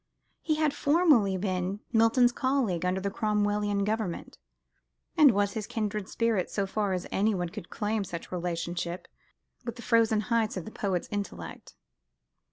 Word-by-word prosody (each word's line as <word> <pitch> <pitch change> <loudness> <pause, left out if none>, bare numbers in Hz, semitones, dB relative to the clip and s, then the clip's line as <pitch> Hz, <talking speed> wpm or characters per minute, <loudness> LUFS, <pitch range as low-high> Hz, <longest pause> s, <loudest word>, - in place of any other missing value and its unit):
He 310 - +1
had 305 -2 +1
formerly 285 - +3
been 185 +1 -2
Milton's 230 +2 +5
colleague 240 -10 0
under 185 +1 0
the 200 +1 -2
Cromwellian 205 -1 0
Government: 210 -4 -3 0.8
and 300 -2 +8
was 200 -3 +1
his 215 -2 -4
kindred 210 -3 -3
spirit, 230 -5 0
so 200 - -1
far 200 0 -1
as 180 -1 -2
anyone 195 -4 +1
could 190 -1 -9
claim 210 0 -1
such 170 -3 -7
relationship 175 0 -3 0.6
with 235 -1 -5
the 240 - -10
frozen 225 -2 +3
heights 225 -2 0
of 180 - -5
the 220 - -8
poet's 190 -5 -2
intellect. 205 -1 -6
210 Hz, 150 wpm, -28 LUFS, 185-230 Hz, 0.8 s, and